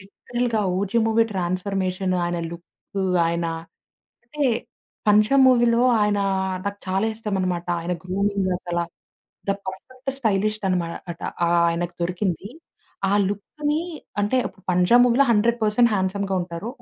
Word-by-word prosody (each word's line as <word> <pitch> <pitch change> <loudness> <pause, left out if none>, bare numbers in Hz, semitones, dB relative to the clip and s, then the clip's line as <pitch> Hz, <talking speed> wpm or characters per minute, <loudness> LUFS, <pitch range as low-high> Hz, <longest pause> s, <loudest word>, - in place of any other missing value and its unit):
లిటరల్‌గా 230 +4 -2 0.2
OG 200 +4 0
movie 225 0 +3
transformation, 185 0 -1
ఆయన 175 0 -1
look, 175 +3 -7 0.2
ఆయన 170 0 -1 0.8
అంటే 290 +5 -3 0.6
'పంజా' 215 +6 +5
మూవీలో 240 -1 +4 0.2
ఆయనా, 205 -1 +2 0.4
నాకు 200 0 -3
చాలా 195 +3 +1
ఇష్టమనమాట. 190 -5 -2
ఆయన 170 +2 -2
గ్రూమింగ్ 195 +1 0
అసల 175 -1 -4 0.7
ద 195 - +4
పర్ఫెక్ట్ 255 +8 -6
స్టైలిష్డ్ 215 -2 0
అనమా 180 -2 +1 0.3
అట 165 - -16 0.5
ఆయనకు 175 +1 -2
దొరికింది. 180 +1 -2 0.6
ఆ - - +2 0.2
లుక్‌ని 295 +10 -2 0.4
అంటే 205 +6 +1 0.3
పంజా 180 +6 +4
మూవీలో 250 +3 +4
100% 230 +1 +3
హ్యాండ్సమ్‌గా 195 0 -1
ఉంటారు. 175 +4 -6
200 Hz, 115 wpm, -23 LUFS, 185-225 Hz, 0.8 s, పంజా